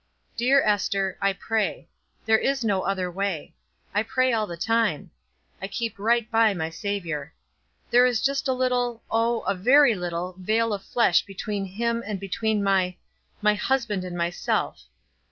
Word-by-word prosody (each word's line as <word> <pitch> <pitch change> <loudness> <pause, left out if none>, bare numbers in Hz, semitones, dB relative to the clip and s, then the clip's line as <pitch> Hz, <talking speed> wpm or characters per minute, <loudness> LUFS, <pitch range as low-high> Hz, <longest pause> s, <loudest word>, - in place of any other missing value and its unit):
"Dear 265 +4 +4
Ester, 195 -2 0
I 200 0 +2
pray. 220 +2 -2 0.4
There 220 0 +4
is 270 -3 0
no 200 -3 +1
other 185 -2 -2
way. 190 -4 -3 0.4
I 205 - +2
pray 255 +3 +1
all 215 -2 0
the 170 - -7
time. 225 -4 0 0.5
I 195 - -3
keep 225 0 -4
right 235 +2 +2
by 225 -2 +4
my 160 -2 -3
Savior. 165 -6 -4 0.6
There 245 +1 +6
is 245 -3 +1
just 275 +3 0
a 260 - +2
little, 245 -2 0
oh, 230 +1 +1
a - - 0
very 250 +7 +5
little, 180 -1 -4
vale 220 +4 +1
of 200 - -3
flesh 235 -6 +3
between 200 0 -4
him 230 +5 -2
and 205 -2 -4
between 210 +2 -1
my 190 -2 +2 0.5
my 210 0 +5
husband 215 -3 -1
and 180 -1 -6
myself. 170 +1 -1
210 Hz, 160 wpm, -25 LUFS, 190-235 Hz, 0.6 s, There